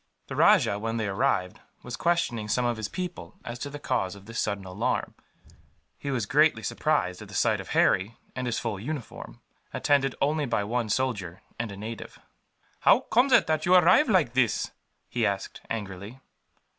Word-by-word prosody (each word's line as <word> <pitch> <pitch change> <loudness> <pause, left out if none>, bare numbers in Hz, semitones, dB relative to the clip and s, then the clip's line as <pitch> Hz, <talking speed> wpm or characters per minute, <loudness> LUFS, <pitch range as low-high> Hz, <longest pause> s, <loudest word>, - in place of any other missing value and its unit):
The - - -5
rajah, 100 - +4
when 115 +2 -2
they 110 -2 -1
arrived, 100 -3 0 0.2
was 125 -1 -5
questioning 170 -11 0
some 125 +3 +1
of 120 -1 0
his 110 -2 -4
people 180 -1 -6
as 120 +1 -6
to 145 - -4
the 145 - -7
cause 95 -9 -1
of 100 0 -14
this 115 +2 -5
sudden 100 -2 -2
alarm. 110 +7 -2 0.8
He 140 - -6
was 125 -6 -1
greatly 145 -2 +3
surprised 100 - 0
at 105 - -9
the 100 - -10
sight 85 - +2
of - - -11
Harry, 100 +5 +2 0.2
in 125 -1 -3
his 115 - -1
full 110 -5 -3
uniform, 135 +2 -7 0.3
attended 135 -2 +1
only 150 +1 +1
by 115 -3 0
one 115 +1 -1
soldier 105 -8 -2 0.2
and 115 -3 -3
a 100 - -8
native. 110 +2 -7 0.6
"How - - +5
comes 255 +4 +2
it - - +6
that 155 0 0
you 180 - +6
arrive 185 - +6
like 175 - +3
this?" 125 -5 +1 0.4
he 120 - -2
asked, 100 -2 -2
angrily. 100 +2 -6
120 Hz, 180 wpm, -27 LUFS, 100-145 Hz, 0.8 s, it